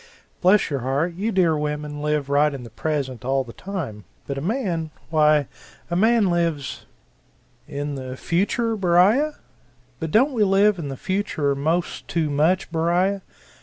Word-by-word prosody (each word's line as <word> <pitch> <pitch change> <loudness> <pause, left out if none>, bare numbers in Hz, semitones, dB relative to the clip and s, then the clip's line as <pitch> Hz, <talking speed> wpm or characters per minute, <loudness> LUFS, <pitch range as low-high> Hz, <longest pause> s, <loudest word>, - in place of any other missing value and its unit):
Bless 185 -1 +4
your 140 - 0
heart, 140 +7 -1
you 205 +6 -2
dear 175 -5 +3
women 150 0 -3
live 150 -2 0
right 145 +1 +3
in 130 - -7
the 115 - -11
present 135 -2 -3
all 135 +1 +1
the 120 -2 -11
time 155 - -6 0.2
but 140 - -4
a 135 - -4
man, 175 - -1 0.2
why 150 -3 +4 0.4
a - - 0
man 220 0 +3
lives 165 -5 -2 0.8
"In 145 +1 -4
the 130 -1 -6
future, 210 - 0
Beriah? 205 - +3 0.6
But 160 - -3
don't 260 - +3
we 225 -4 +2
live 195 0 +3
in 155 - -4
the 135 - -5
future 185 -7 -1
most 160 +5 -1
too 160 -3 -1
much, 160 +6 +1
Beriah? 175 +4 +1
165 Hz, 160 wpm, -23 LUFS, 145-190 Hz, 0.8 s, Bless